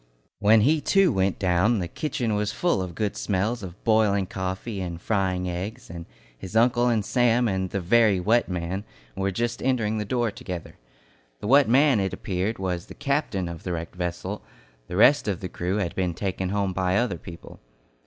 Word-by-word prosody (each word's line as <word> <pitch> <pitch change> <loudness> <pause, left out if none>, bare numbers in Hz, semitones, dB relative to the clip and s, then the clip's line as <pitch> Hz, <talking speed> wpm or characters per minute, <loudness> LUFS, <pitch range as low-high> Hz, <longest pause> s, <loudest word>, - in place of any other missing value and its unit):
When 105 +2 +5
he 150 +7 +3
too 195 -1 +3
went 95 0 +1
down, 95 +5 +2
the 90 -3 -2
kitchen 120 - -2
was 105 0 0
full 175 - 0
of 90 -2 -5
good 105 +1 -2
smells 105 +4 -1
of 95 -1 -10
boiling 110 -4 +3
coffee 95 +3 -4
and 85 -2 -5
frying 95 -2 -1
eggs, 90 +2 -5
and 85 -1 -8 0.3
his 95 - -9
uncle 120 +1 +4
and 110 -4 +1
Sam 120 0 +2
and 95 -2 -1
the 100 - -2
"very 105 +1 +4
wet 110 +5 +2
man" 90 +2 -3 0.3
were 95 0 -1
just 120 +4 -2
entering 110 -4 0
the - - -1
door 120 +1 0
together. 90 -4 -8 0.6
The - - -8
wet 140 0 +5
man, 135 -1 +5
it 95 -1 -1
appeared, 95 +4 -2
was 90 -2 -3
the - - -11
captain 140 - -1
of 85 -1 -7
the 90 - -4
wrecked 85 0 -5
vessel; 90 +3 -4 0.5
the 90 - -4
rest 140 +6 +5
of 95 -3 -1
the 90 - -5
crew 90 +2 -2
had 95 -5 -2
been 90 -3 -1
taken 95 0 -2
home 100 -1 -1
by 95 +1 +1
other 120 -9 0
people. 85 +2 -11
100 Hz, 195 wpm, -25 LUFS, 90-115 Hz, 0.6 s, When